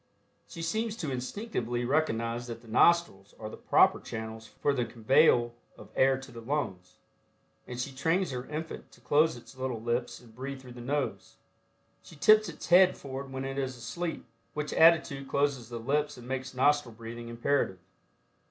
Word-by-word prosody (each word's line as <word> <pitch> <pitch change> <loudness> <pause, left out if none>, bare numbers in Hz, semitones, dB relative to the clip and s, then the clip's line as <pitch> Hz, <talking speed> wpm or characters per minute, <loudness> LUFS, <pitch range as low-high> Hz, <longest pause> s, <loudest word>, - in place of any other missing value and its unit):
She 165 - -7
seems 220 +6 -1
to 160 -11 -4
instinctively 125 - -3
recognize 120 -4 0
that 115 -1 -7
the - - -16
nostrils 110 - +3
are 110 0 -6
the - - -7
proper - - +4
channels 110 0 -7
for 145 - -1
the 125 -3 0
conveyal 120 +1 +3 0.2
of - - -13
air 135 0 +4
to 135 -1 -11
the 115 -1 -9
lungs, 95 -9 -3 0.7
and 125 0 -6
she 135 +2 -3
trains 165 +5 0
her 125 0 -5
infant 155 +2 -6
to - - -19
close 155 -1 +3
its 120 - -14
little 130 -3 -3
lips 120 +2 -2
and 115 -2 -17
breathe 135 +3 -6
through 130 -1 -12
the 120 - -10
nose. 140 +3 -3 0.7
She - - -14
tips 215 +7 +5
its - - -9
head 185 +1 +6
forward 135 0 -7
when 130 0 -4
it 135 +1 -3
is 130 -2 -3
asleep, 160 +9 -4 0.3
which 150 -1 -3
attitude 160 -4 +4
closes 140 -5 0
the 120 - -5
lips 145 +5 0
and 120 0 -11
makes 130 0 -4
nostril 140 -3 +2
breathing 115 +1 -8
imperative. 115 -4 0
130 Hz, 175 wpm, -30 LUFS, 120-150 Hz, 0.7 s, head